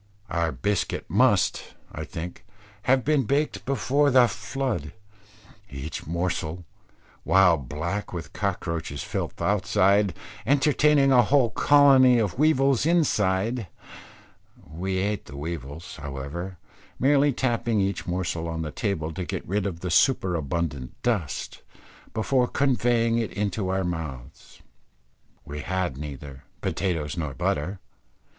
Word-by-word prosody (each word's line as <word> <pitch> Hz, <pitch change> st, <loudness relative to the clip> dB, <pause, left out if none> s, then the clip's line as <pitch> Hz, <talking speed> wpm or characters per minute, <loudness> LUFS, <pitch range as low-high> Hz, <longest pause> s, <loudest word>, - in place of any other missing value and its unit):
Our 85 Hz, -2 st, 0 dB
biscuit 100 Hz, +2 st, -2 dB
must, -, -, +2 dB, 0.2 s
I -, -, -6 dB
think, 85 Hz, +2 st, -7 dB, 0.5 s
have 130 Hz, -2 st, +4 dB
been 145 Hz, -3 st, +2 dB
baked 145 Hz, +5 st, 0 dB
before 140 Hz, +1 st, +2 dB
the 130 Hz, -2 st, +6 dB
flood, 120 Hz, -, -3 dB, 0.8 s
each 70 Hz, +2 st, -6 dB
morsel, 85 Hz, 0 st, -2 dB, 0.6 s
while 90 Hz, +1 st, +5 dB
black 80 Hz, +9 st, -4 dB
with 80 Hz, -5 st, -7 dB
cockroaches' 85 Hz, -8 st, -3 dB
filth -, -, -4 dB
outside, 100 Hz, -1 st, +2 dB, 0.3 s
entertaining 145 Hz, +1 st, +4 dB
a 125 Hz, -2 st, +7 dB
whole 125 Hz, 0 st, +3 dB
colony 135 Hz, -3 st, +6 dB
of 110 Hz, -1 st, -1 dB
weevils 140 Hz, -3 st, +3 dB
inside; 110 Hz, -, +1 dB, 1.0 s
we 90 Hz, +5 st, -3 dB
ate 100 Hz, +2 st, -1 dB
the 70 Hz, -, -10 dB
weevils, 80 Hz, +1 st, -6 dB
however, 70 Hz, +6 st, -6 dB, 0.4 s
merely 140 Hz, +2 st, +4 dB
tapping 120 Hz, -4 st, 0 dB
each 95 Hz, -2 st, -1 dB
morsel 85 Hz, -2 st, -2 dB
on 80 Hz, 0 st, -3 dB
the 75 Hz, -, -5 dB
table 80 Hz, -7 st, -2 dB
to 90 Hz, -, -4 dB
get -, -, -5 dB
rid 100 Hz, +1 st, 0 dB
of 85 Hz, -3 st, -6 dB
the 90 Hz, -, -3 dB
superabundant 85 Hz, -, 0 dB
dust, 85 Hz, -, -2 dB, 0.5 s
before 125 Hz, +3 st, +1 dB
conveying 120 Hz, -4 st, +2 dB
it 115 Hz, -, -3 dB, 0.2 s
to 95 Hz, 0 st, -3 dB
our 95 Hz, 0 st, 0 dB
mouths. 80 Hz, -8 st, -7 dB, 0.8 s
We 75 Hz, +1 st, -6 dB
had 90 Hz, -2 st, -2 dB
neither 70 Hz, -1 st, -8 dB, 0.2 s
potatoes 85 Hz, -5 st, -2 dB
nor 75 Hz, -5 st, -3 dB
butter. 75 Hz, +9 st, -1 dB
95 Hz, 120 wpm, -25 LUFS, 80-125 Hz, 1.0 s, a